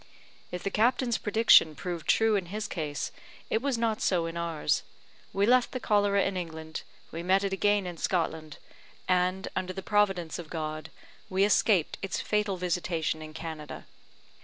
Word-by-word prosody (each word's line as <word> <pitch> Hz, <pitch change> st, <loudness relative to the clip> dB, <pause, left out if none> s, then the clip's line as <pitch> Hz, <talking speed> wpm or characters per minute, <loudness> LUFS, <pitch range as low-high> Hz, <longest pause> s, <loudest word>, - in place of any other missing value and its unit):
If 180 Hz, -, -5 dB
the 195 Hz, -, -2 dB
captain's 240 Hz, +1 st, +2 dB
prediction 210 Hz, -7 st, +5 dB
proved 175 Hz, 0 st, -5 dB
true 225 Hz, -1 st, +4 dB
in 190 Hz, -3 st, -1 dB
his 210 Hz, +4 st, -4 dB
case, 150 Hz, -4 st, -3 dB, 0.4 s
it 220 Hz, -, +2 dB
was 275 Hz, -2 st, 0 dB
not 225 Hz, -2 st, 0 dB
so 175 Hz, -3 st, +2 dB
in 165 Hz, 0 st, -5 dB
ours. 170 Hz, -2 st, 0 dB, 0.5 s
We 200 Hz, +1 st, +2 dB
left 250 Hz, +2 st, +3 dB
the 255 Hz, -, -2 dB
cholera 205 Hz, -3 st, +2 dB
in 195 Hz, -, -1 dB
England, 160 Hz, -3 st, -5 dB, 0.3 s
we 165 Hz, -, -5 dB
met 190 Hz, +3 st, +2 dB
it 195 Hz, -1 st, -1 dB
again 205 Hz, 0 st, +2 dB
in 175 Hz, -2 st, -6 dB
Scotland, 160 Hz, -3 st, -2 dB, 0.5 s
and, 185 Hz, +1 st, +1 dB
under 185 Hz, 0 st, -2 dB
the 190 Hz, 0 st, -6 dB
providence 195 Hz, -6 st, +1 dB
of 165 Hz, -3 st, -8 dB
God, 155 Hz, -1 st, -4 dB, 0.4 s
we 190 Hz, +1 st, +2 dB
escaped 205 Hz, -4 st, +3 dB
its 195 Hz, -2 st, -2 dB
fatal 210 Hz, -2 st, 0 dB
visitation 175 Hz, -3 st, -1 dB
in 155 Hz, 0 st, -9 dB
Canada. 160 Hz, -3 st, -7 dB
185 Hz, 165 wpm, -29 LUFS, 165-205 Hz, 0.5 s, prediction